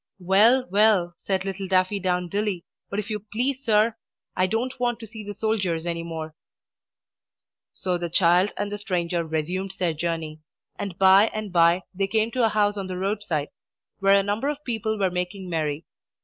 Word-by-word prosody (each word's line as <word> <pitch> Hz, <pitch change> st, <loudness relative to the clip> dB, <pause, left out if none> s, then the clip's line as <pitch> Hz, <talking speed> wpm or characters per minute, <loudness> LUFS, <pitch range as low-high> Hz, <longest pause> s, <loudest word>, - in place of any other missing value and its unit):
"Well, 210 Hz, +8 st, +4 dB
well," 200 Hz, -4 st, +4 dB
said 190 Hz, -1 st, 0 dB
little 195 Hz, 0 st, -4 dB
Daffydowndilly, 185 Hz, 0 st, 0 dB, 0.3 s
"but 200 Hz, -, -4 dB
if 210 Hz, +1 st, -3 dB
you 210 Hz, -, -1 dB
please, 265 Hz, +4 st, -1 dB
sir, 220 Hz, 0 st, +3 dB, 0.4 s
I 185 Hz, -, +2 dB
don't 245 Hz, +6 st, -2 dB
want 240 Hz, -1 st, 0 dB
to -, -, -6 dB
see 220 Hz, 0 st, -9 dB
the 205 Hz, 0 st, -7 dB
soldiers 190 Hz, -7 st, -1 dB
any 170 Hz, -1 st, -2 dB
more." 160 Hz, -2 st, -6 dB, 1.4 s
So 180 Hz, -2 st, -2 dB
the 170 Hz, 0 st, -3 dB
child 175 Hz, +3 st, +3 dB
and 205 Hz, 0 st, -2 dB
the 205 Hz, -, -4 dB
stranger 175 Hz, -4 st, -1 dB
resumed 175 Hz, +5 st, -3 dB
their 175 Hz, -4 st, 0 dB
journey; 160 Hz, -1 st, -3 dB, 0.4 s
and, 200 Hz, -4 st, -5 dB
by 195 Hz, +2 st, +6 dB
and 215 Hz, -3 st, -4 dB
by, 170 Hz, +1 st, +4 dB
they 195 Hz, +1 st, -1 dB
came 220 Hz, +2 st, +1 dB
to 255 Hz, -1 st, 0 dB
a 225 Hz, -, +4 dB
house 210 Hz, -1 st, +2 dB
by 200 Hz, -2 st, -5 dB
the 185 Hz, -1 st, -5 dB
road 200 Hz, +3 st, -1 dB
side, 155 Hz, -7 st, -2 dB, 0.5 s
where 195 Hz, 0 st, +5 dB
a -, -, 0 dB
number 210 Hz, +8 st, -1 dB
of 295 Hz, 0 st, -4 dB
people 220 Hz, -2 st, -1 dB
were 190 Hz, -3 st, +1 dB
making 180 Hz, +1 st, -4 dB
merry. 155 Hz, -1 st, -2 dB
195 Hz, 180 wpm, -25 LUFS, 175-215 Hz, 1.4 s, by